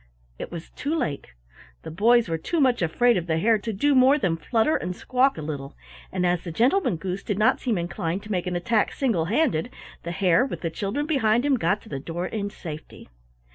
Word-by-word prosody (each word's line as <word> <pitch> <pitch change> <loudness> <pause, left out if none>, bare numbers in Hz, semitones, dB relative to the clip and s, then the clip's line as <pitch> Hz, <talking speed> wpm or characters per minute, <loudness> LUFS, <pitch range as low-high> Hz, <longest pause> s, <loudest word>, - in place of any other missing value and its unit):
It - - -6
was 170 -1 -8
too 295 +4 -3
late. 150 - -3 0.5
The - - -7
boys 230 +6 +4
were 165 -1 -2
too 335 - -2
much 255 -6 +3
afraid 235 +8 +3
of 175 -1 -3
the 160 -1 +1
Hare 220 +5 +3
to 225 +2 -4
do 285 +9 +2
more 265 +2 +5
than 185 - 0
flutter 225 - +1
and 180 +1 -3
squawk 255 +3 +1
a 155 - -5
little, 145 -2 -6 0.4
and 180 -1 -1
as 175 -1 +1
the 170 - -5
Gentleman 245 - +2
Goose 185 +3 -4
did 205 -2 -3
not 215 - +3
seem 235 -6 -1
inclined 175 +1 -3
to 215 - -8
make 180 -2 -1
an 180 - -2
attack 215 +5 +1
single 225 - 0
handed, 225 - +1 0.3
the 170 - -6
Hare, 185 +4 +3
with 265 - -5
the 165 - -2
children 205 - -2
behind 245 -5 +2
him, 290 - +3
got 210 -3 0
to 220 - -14
the 135 - -4
door 170 +5 -4
in 205 0 -3
safety. 155 - -9
200 Hz, 220 wpm, -25 LUFS, 170-245 Hz, 0.5 s, more